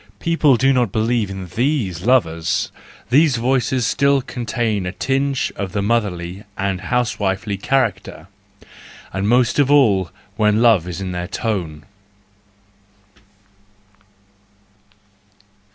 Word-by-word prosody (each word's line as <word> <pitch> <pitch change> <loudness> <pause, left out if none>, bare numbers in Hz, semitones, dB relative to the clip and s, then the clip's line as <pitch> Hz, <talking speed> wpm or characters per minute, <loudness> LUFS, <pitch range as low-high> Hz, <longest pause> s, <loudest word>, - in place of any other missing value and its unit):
People 155 -6 +3
do 135 +3 +3
not 125 -6 +1
believe 110 -1 0
in 95 -1 -6
these 105 - -2
lovers; 85 -11 +1 0.4
these 145 +1 +4
voices 125 0 0
still 140 +1 +2
contain 115 -6 -2
a - - -3
tinge 135 +4 -1
of 95 -2 -5
the 100 - -1
motherly 100 -4 -2
and 95 -2 -2
housewifely 100 -2 -1
character, 110 -3 -1 0.9
and 95 +2 -1
most 125 +2 +2
of 140 -2 +3
all 105 -11 +4 0.3
when 105 -1 +2
love 115 -8 +4
is 90 +2 -5
in 95 -1 -4
their 90 0 -4
tone. 90 -8 -3
110 Hz, 110 wpm, -19 LUFS, 95-130 Hz, 0.9 s, these